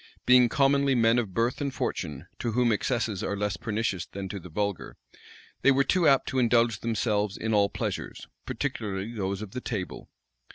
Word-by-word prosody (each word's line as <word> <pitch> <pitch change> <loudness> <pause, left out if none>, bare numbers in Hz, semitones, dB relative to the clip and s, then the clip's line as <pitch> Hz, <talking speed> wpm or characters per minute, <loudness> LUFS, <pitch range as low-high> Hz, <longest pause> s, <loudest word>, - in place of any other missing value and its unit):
Being 125 -1 +6
commonly 140 +1 +3
men 115 0 +4
of 105 -6 -4
birth 115 +4 0
and 140 -1 -1
fortune, 75 - -4
to 115 -2 -2
whom 120 0 +3
excesses 110 -2 -1
are 100 - -2
less 105 -1 -1
pernicious 110 -4 -2
than 95 -1 -6
to 100 0 -5
the 90 - -11
vulgar, 100 +2 -3 0.6
they - - +5
were 140 0 +4
too 175 +2 +2
apt 135 -1 +4
to 130 - 0
indulge 115 -3 +3
themselves 105 -3 -1
in 110 0 -2
all 100 -1 +4
pleasures, - - -5 0.2
particularly 100 +1 -3
those 100 -1 -3
of 100 - -9
the 125 - -5
table. 100 -8 -5
110 Hz, 180 wpm, -27 LUFS, 100-125 Hz, 0.6 s, Being